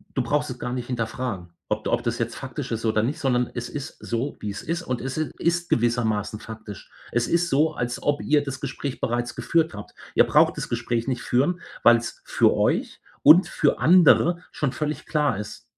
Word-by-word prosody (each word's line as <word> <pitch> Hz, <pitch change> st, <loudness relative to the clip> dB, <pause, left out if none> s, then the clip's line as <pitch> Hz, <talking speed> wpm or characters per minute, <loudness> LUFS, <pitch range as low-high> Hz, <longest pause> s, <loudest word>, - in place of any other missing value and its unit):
Du 130 Hz, -, +1 dB
brauchst 145 Hz, +4 st, 0 dB
es 125 Hz, 0 st, -7 dB
gar 125 Hz, -, -4 dB
nicht 125 Hz, -1 st, -4 dB
hinterfragen, 115 Hz, -6 st, -3 dB, 0.2 s
ob -, -, -2 dB
ob -, -, +1 dB
das -, -, -1 dB
jetzt -, -, -2 dB
faktisch -, -, -6 dB
ist 115 Hz, 0 st, -3 dB
oder 110 Hz, -1 st, +2 dB
nicht, 145 Hz, +7 st, -2 dB
sondern 125 Hz, -4 st, +1 dB
es 120 Hz, 0 st, -4 dB
ist 145 Hz, -2 st, -7 dB
so, 120 Hz, +5 st, -3 dB
wie 105 Hz, -, -4 dB
es 100 Hz, -, -5 dB
ist 170 Hz, +1 st, -2 dB
und 125 Hz, -5 st, -3 dB
es 135 Hz, +2 st, -4 dB
i 155 Hz, -4 st, -1 dB
ist 170 Hz, +1 st, 0 dB
gewissermaßen 110 Hz, -3 st, 0 dB
faktisch. 110 Hz, -3 st, -10 dB, 0.2 s
Es 120 Hz, 0 st, +1 dB
ist 170 Hz, 0 st, +1 dB
so, 155 Hz, +3 st, +2 dB
als 120 Hz, -4 st, -3 dB
ob 145 Hz, 0 st, 0 dB
ihr 150 Hz, 0 st, +3 dB
das 135 Hz, -2 st, -6 dB
Gespräch 140 Hz, -1 st, -5 dB
bereits 120 Hz, +1 st, -1 dB
geführt 165 Hz, -5 st, +1 dB
habt. 105 Hz, 0 st, -9 dB, 0.2 s
Ihr -, -, +7 dB
braucht -, -, +4 dB
das -, -, -4 dB
Gespräch 120 Hz, 0 st, -2 dB
nicht 125 Hz, -, -2 dB
führen, 145 Hz, +9 st, +1 dB, 0.2 s
weil 120 Hz, 0 st, +7 dB
es 115 Hz, -, -7 dB
für -, -, +3 dB
euch -, -, 0 dB, 0.2 s
und 165 Hz, +6 st, +8 dB
für -, -, +1 dB
andere 175 Hz, 0 st, +5 dB
schon 145 Hz, -4 st, -1 dB
völlig 150 Hz, +3 st, -3 dB
klar 150 Hz, -, +1 dB
ist. 105 Hz, 0 st, -7 dB
125 Hz, 210 wpm, -24 LUFS, 115-150 Hz, 0.2 s, und